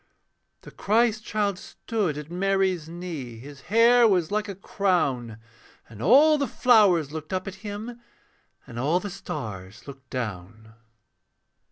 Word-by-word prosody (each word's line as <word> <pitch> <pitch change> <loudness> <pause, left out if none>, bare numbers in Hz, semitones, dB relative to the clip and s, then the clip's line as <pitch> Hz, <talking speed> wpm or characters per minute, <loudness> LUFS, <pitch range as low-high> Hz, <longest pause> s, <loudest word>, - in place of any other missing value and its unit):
The - - -13
Christ 220 +1 +1
child 205 -4 -1
stood 200 -10 -3
at 150 +2 -8
Mary's 190 -3 0
knee, 165 -9 -7
His 140 +3 -12
hair 230 +3 +5
was 180 -5 +1
like 210 0 -1
a 200 - -6
crown, 145 - -1 0.5
And 110 -1 -12
all 290 - +5
the 280 - 0
flowers 200 - +3
looked 155 +1 -7
up 185 0 -3
at 195 - -5
him. 220 +3 -7 0.6
And 115 - -8
all 155 +8 +1
the 205 +1 -6
stars 100 - -7
looked 135 -2 -12
down. 110 -2 -6
180 Hz, 140 wpm, -25 LUFS, 135-210 Hz, 0.6 s, hair